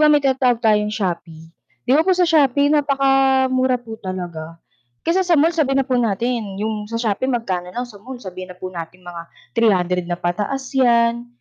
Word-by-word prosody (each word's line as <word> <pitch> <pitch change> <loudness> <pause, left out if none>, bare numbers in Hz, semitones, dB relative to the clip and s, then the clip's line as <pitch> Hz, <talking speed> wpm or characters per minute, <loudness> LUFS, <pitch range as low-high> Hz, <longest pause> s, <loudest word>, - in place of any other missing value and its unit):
ba, 305 0 +6
may 295 -1 +4
tinatawag 260 -3 +2
tayong 210 -2 +2
Shopee. 170 -5 -4 0.3
'Di - - -3
ba 315 - +4
po 380 - +4
sa 360 0 +2
Shopee 285 -3 +3
napakamura 270 -3 +2
po 225 -2 -9
talaga, 170 -4 -6 0.4
kaysa 365 +3 +2
sa 350 - +4
mall. 330 +3 +3
Sabihin 275 -4 +2
na 265 - -12
po 255 - +2
natin 225 -2 -1
'yong 215 -1 -3
sa 230 - -2
Shopee 230 +3 -1
magkano 185 -7 -3
lang 245 +4 -4
sa 210 -4 -13
mall 255 +1 -9
sabihin 185 -3 -8
na - - -21
po 185 - -5
natin 170 +1 -8
mga 175 -1 -7 0.3
300 180 -6 +2
na 175 0 -3
pataas 205 +11 -2
yan. 235 -2 +3
230 Hz, 190 wpm, -20 LUFS, 185-270 Hz, 0.4 s, ba